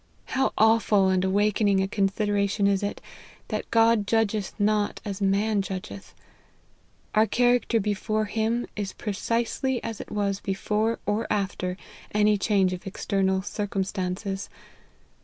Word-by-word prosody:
How 265 +1 +1
awful 215 -3 +4
and 185 -1 +2
awakening 205 +1 +2
a 190 - +1
consideration 200 0 0
is 200 -1 +2
it, 205 0 -3 0.5
that - - -3
God 225 -2 +4
judge 225 -2 +2
th 210 -3 -3
not 210 0 +1
as 200 -1 -5
man 200 +2 +2
judge 190 -1 -5
th! 200 - -11 1.0
Our 215 +1 +4
character 245 0 +2
before 215 +1 -1
him, 225 +3 -1
is 205 -2 -4
precisely 230 +5 -1
as 225 -2 -5
it - - -10
was 200 -1 -1
before 210 +3 -1
or 215 +2 0
after 190 -3 -1 0.4
any 210 0 +4
change 195 -3 +2
of 180 +1 -7
external 190 0 0
circumstances. 195 -1 -3
205 Hz, 135 wpm, -26 LUFS, 195-220 Hz, 1.0 s, awful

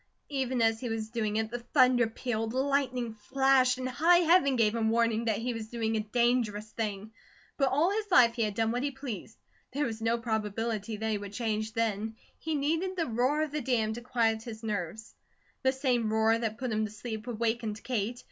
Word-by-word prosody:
Even 260 -4 0
as 225 0 +2
he 245 - -4
was 220 -1 -3
doing 215 -3 -1
it 220 0 -1
the 240 - -3
thunder 250 -1 +4
pealed; 225 -1 -3
lightning 260 -3 0
flashed, 260 +3 +3
and 255 0 -3
high 325 +8 +4
Heaven 325 -5 +4
gave 225 -3 +3
him 225 -1 +1
warning 230 0 +1
that 220 -3 +1
he 240 +3 -2
was 225 -1 -6
doing 225 -1 -2
a - - +1
dangerous 220 -1 +1
thing; 215 -1 -4 0.4
but 275 -2 +2
all 300 +8 +2
his 420 0 -2
life 245 -11 +6
he 235 - -3
had 210 -2 0
done 225 0 +1
what 245 +1 -1
he 285 - 0
pleased; 260 -6 -7 0.4
there 290 +2 0
was 225 -2 -4
no 230 +1 +1
probability 220 -1 -2
that 220 +1 -2
he 210 - 0
would 200 0 -8
change 220 -1 -2
then. 220 -1 -1 0.2
He 320 -1 -2
needed 325 +6 0
the 335 -3 0
roar 255 +6 +1
of 310 - -4
the 300 0 -2
dam 230 -4 0
to 240 - -7
quiet 230 -2 +1
his 225 -1 -9
nerves. 210 0 -4 0.5
The 260 - +3
same 250 -5 0
roar 220 +1 +3
that 220 -2 -2
put 250 -1 -3
him 215 0 0
to 210 - -7
sleep, 220 +1 -6
awakened 225 -2 -2
Kate. 240 -1 -2
230 Hz, 210 wpm, -30 LUFS, 220-255 Hz, 0.5 s, life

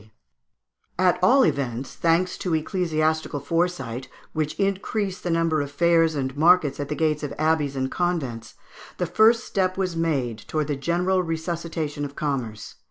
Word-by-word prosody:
] - - -49
At 180 - +3
all 255 +8 +6
events, 130 -2 -2
thanks 170 +2 +1
to 175 -3 0
ecclesiastical 160 -3 0
foresight, 140 -6 -2 0.3
which 155 -1 -2
increased 195 0 -1
the 175 - -2
number 165 -2 +1
of 140 - -4
fairs 165 +1 +3
and 130 -2 -2
markets 155 -2 +4
at 145 -1 -4
the 150 - -2
gates 155 -1 +1
of 145 - -4
abbeys 155 -3 +1
and 130 0 -2
convents, 135 -11 -2 0.4
the - - 0
first 225 +2 +4
step 185 -2 -1
was 185 -3 -1
made 140 -9 -1
towards 155 -1 -1
the 145 - 0
general 175 +6 +1
resuscitation 165 -3 -3
of 140 0 -6
commerce. 130 -8 -4
160 Hz, 160 wpm, -24 LUFS, 145-180 Hz, 0.4 s, all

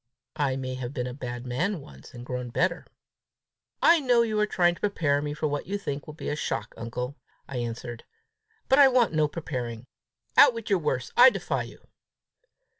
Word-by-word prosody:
I 140 -3 +1
may 130 -1 -4
have 130 +1 -6
been 125 -3 -2
a 125 - -5
bad 120 -2 -6
man 165 +10 -1
once, 70 - -14
and 120 0 -9
grown 125 -1 -4
better!" 120 - 0 1.0
"I 335 0 +7
know 245 -4 +3
you 215 -2 -1
are 210 - +2
trying 175 -3 +3
to - - -14
prepare 155 -8 +1
me 145 0 -4
for 155 - -3
what 145 0 -3
you 200 +2 -2
think 145 -8 -5
will 155 - -9
be - - -5
a - - -1
shock, 115 -7 -3
uncle!" 125 +4 -5 0.3
I 130 - -5
answered; 120 0 -5 0.6
"but 265 - +4
I 280 - +9
want 250 -7 +3
no 155 -1 +3
preparing. 125 -7 -5 0.5
Out 240 - +7
with 230 -2 -6
your 195 - +4
worst! 125 -5 -2
I 250 +2 +9
defy - - -2
you!" - - -11
145 Hz, 195 wpm, -27 LUFS, 125-200 Hz, 1.0 s, I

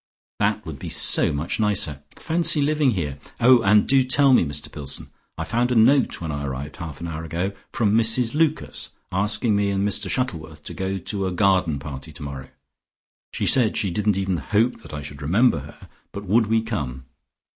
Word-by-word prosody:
That - - 0
would - - -8
be - - -6
so - - +4
much 80 +9 -3
nicer. 100 -10 0
Fancy 165 -1 +2
living 150 -1 +2
here! 75 - -3 0.2
Oh, 125 0 +6
and 105 0 +4
do 135 -1 +4
tell 135 +1 +4
me - - +5
something, 80 - -2
Mr 75 0 -5
Pillson. 70 -2 -5 0.3
I - - -3
found 120 +2 0
a - - +1
note 125 +4 +3
when 80 -2 -4
I 70 0 -4
arrived 70 +1 -6
half 80 -3 -8
an 85 - -4
hour 80 -1 -5
ago, 85 +5 -3 0.2
from 105 -2 +1
Mrs 115 +1 +3
Lucas 155 0 0 0.2
asking 105 +3 +1
me 100 0 +1
and 100 0 0
Mr 100 -1 +1
Shuttleworth 80 - -3
to - - -6
go 95 0 -3
to 95 +1 -3
a - - -2
garden 90 -4 +2
party 70 +1 -8
tomorrow. 70 -4 -8 0.8
She - - -3
said 120 -5 +3
she 100 - 0
didn't 105 +2 0
even 95 -2 -1
hope 105 - 0
that - - -13
I 75 -1 -6
should 70 0 -9
remember 100 - +2
her, - - -13 0.2
but 100 +1 -8
would 110 +3 +2
we 110 0 +1
come. 70 - -5
100 Hz, 200 wpm, -23 LUFS, 75-115 Hz, 0.8 s, Oh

